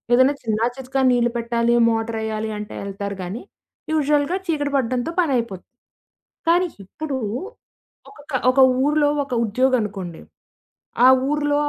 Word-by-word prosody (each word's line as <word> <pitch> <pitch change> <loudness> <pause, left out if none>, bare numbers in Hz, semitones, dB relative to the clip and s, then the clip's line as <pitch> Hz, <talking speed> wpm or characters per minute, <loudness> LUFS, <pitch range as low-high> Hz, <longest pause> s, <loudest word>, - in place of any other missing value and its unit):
ఏదైనా 260 +3 +4
చిన్నా, 220 0 0
చితకా 265 +1 -2
నీళ్లు 240 -1 +2
పెట్టాలి, 235 0 +1
మోటారేయ్యాలి 220 -1 -2
అంటే 210 - -7
ఏళ్తారు 200 0 -5
గానీ, 190 +7 -6 0.5
యూజువల్‌గా 300 +3 +1
చీకటి 290 -3 -1
పడడంతో 255 +5 -1
పనైయిపోతుంది. 240 - -2 0.7
కానీ, 355 +2 +4 0.2
ఇప్పుడు 280 +6 -5 0.9
ఒక‌కా 290 -8 -4
ఒక 270 - 0 0.3
ఊరిలో 295 0 +3 0.2
ఒక 265 - -7
ఉద్యోగనుకోండి 210 -7 -1 0.8
ఆ - - +9 0.2
ఊరిలో 290 -1 +1
250 Hz, 115 wpm, -21 LUFS, 220-290 Hz, 0.9 s, ఆ